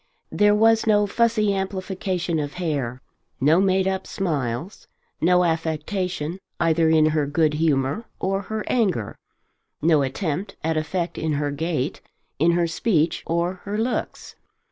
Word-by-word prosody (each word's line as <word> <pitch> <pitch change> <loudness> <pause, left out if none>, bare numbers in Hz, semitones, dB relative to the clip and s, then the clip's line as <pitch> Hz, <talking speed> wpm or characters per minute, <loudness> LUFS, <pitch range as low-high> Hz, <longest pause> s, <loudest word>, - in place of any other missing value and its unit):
There 205 0 +4
was 225 +1 +4
no 210 -1 +4
fussy 215 -1 +2
amplification 190 -3 -2
of 145 -1 -3
hair, 140 -8 -3 0.4
no 155 +6 +4
made 190 -1 +2
up 190 0 -2
smiles, 155 - -3 0.3
no 180 +2 +4
affectation 165 +1 -2 0.2
either 165 -1 +3
in 160 -1 +5
her 155 -2 0
good 150 +1 +2
humour 150 - 0
or 195 +1 0
her 220 +1 -4
anger, 190 - 0 0.6
no 155 -2 +3
attempt 160 +7 -3
at 160 +1 0
effect 170 +3 -2
in 160 -1 -1
her 145 0 -1
gait, 155 -2 -2 0.4
in 170 +3 +4
her 175 0 +2
speech, 165 -1 +1
or 170 +2 -1
her 205 +1 -3
looks. 235 +3 -3
170 Hz, 140 wpm, -23 LUFS, 155-195 Hz, 0.6 s, in